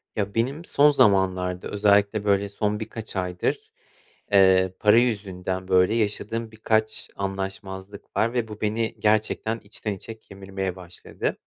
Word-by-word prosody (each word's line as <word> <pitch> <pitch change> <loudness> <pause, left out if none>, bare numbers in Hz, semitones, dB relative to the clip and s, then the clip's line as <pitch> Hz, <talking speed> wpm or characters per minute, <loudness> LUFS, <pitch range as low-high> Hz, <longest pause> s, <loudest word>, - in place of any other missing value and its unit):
Ya, 100 -2 -2
benim 135 +9 -1
son 145 -2 +5
zamanlarda 95 -6 +2
özellikle, 100 0 +2
böyle, 100 0 +2
son 105 +1 -1
birkaç 110 -1 -7
aydır, 90 -1 -2 0.6
eee, 95 -2 +5
para 105 +1 +5
yüzünden, 95 -6 -1
böyle, 95 +2 +4
yaşadığım 115 +1 -2
birkaç 110 0 0
anlaşmazlık 95 0 -6
var 115 +2 +2
ve 120 -3 -1
bu 105 -1 -10
beni 110 +1 -1
gerçekten 110 +1 +1
içten 105 +1 -5
içe 110 +3 -9
kemirmeye 95 -2 -6
başladı. 90 -1 -5
100 Hz, 130 wpm, -24 LUFS, 95-110 Hz, 0.6 s, son